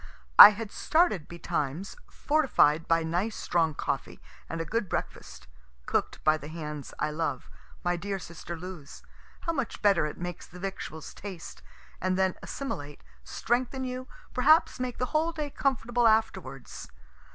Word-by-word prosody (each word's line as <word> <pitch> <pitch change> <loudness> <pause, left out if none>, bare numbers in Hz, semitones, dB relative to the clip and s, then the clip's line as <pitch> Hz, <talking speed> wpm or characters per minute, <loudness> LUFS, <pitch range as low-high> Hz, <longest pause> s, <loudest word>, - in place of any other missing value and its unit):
I - - +15
had 210 0 -5
started 315 - +2
betimes, 170 +1 -3
fortified 245 - +2
by 165 0 +3
nice 180 +7 -1
strong 165 -3 0
coffee - - -3 0.3
and 165 - -4
a 165 - -2
good 215 +1 -2
breakfast - - -5 0.4
(cook'd - - -1
by 155 0 +4
the 145 - -10
hands 150 -3 -6
I 150 - -1
love, 160 +2 -3 0.3
my 175 -1 +1
dear 195 +3 -3
sister 170 -1 -8
Lou's 170 -4 -9 0.4
how 335 - -1
much 270 -6 -3
better 195 -7 +4
it 150 - -7
makes 175 -1 -6
the 180 - -12
victuals 185 -5 -6
taste, 190 -5 -9 0.4
and 185 0 0
then 190 -1 +2
assimilate, 145 - -6 0.2
strengthen 255 +2 -1
you, 255 0 -5 0.3
perhaps 295 +3 +4
make 250 -1 -3
the 250 - 0
whole 320 +2 +2
day 300 -3 -4
comfortable 240 -4 +1
afterwards.) 190 - -1
190 Hz, 150 wpm, -28 LUFS, 160-245 Hz, 0.4 s, I